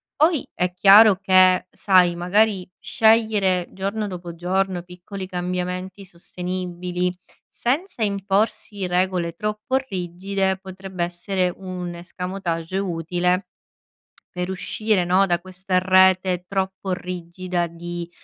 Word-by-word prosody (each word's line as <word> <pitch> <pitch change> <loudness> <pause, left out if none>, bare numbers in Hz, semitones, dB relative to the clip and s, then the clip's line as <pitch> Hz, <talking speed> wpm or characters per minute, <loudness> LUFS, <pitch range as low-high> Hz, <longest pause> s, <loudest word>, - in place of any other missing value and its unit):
Poi, 315 -1 +2
è 180 0 -1
chiaro 205 +3 +8
che 185 -1 +5
sai, 180 -3 +3
magari, 190 +1 +1
scegliere 215 -5 +2
giorno 200 +2 -3
dopo 175 -2 -7
giorno 185 +1 -1
piccoli 180 +2 -8
cambiamenti 180 +1 -4
sostenibili, 180 0 -4 0.4
senza 270 - -2
imporsi 200 0 -1
regole 180 -2 0
troppo 210 +6 -2
rigide, 190 +1 -2
potrebbe 190 -1 -6
essere 180 +1 -1
un 180 -2 -6
escamotage 180 0 -4
utile 180 0 -1 0.9
per 180 +1 -2
uscire, 190 +1 0
no, 185 +3 +4
da 175 -1 +1
questa 185 +1 -1
rete 185 -1 +4
troppo 190 0 -3
rigida 180 0 -3
di, 175 0 -7
185 Hz, 105 wpm, -22 LUFS, 180-195 Hz, 0.9 s, chiaro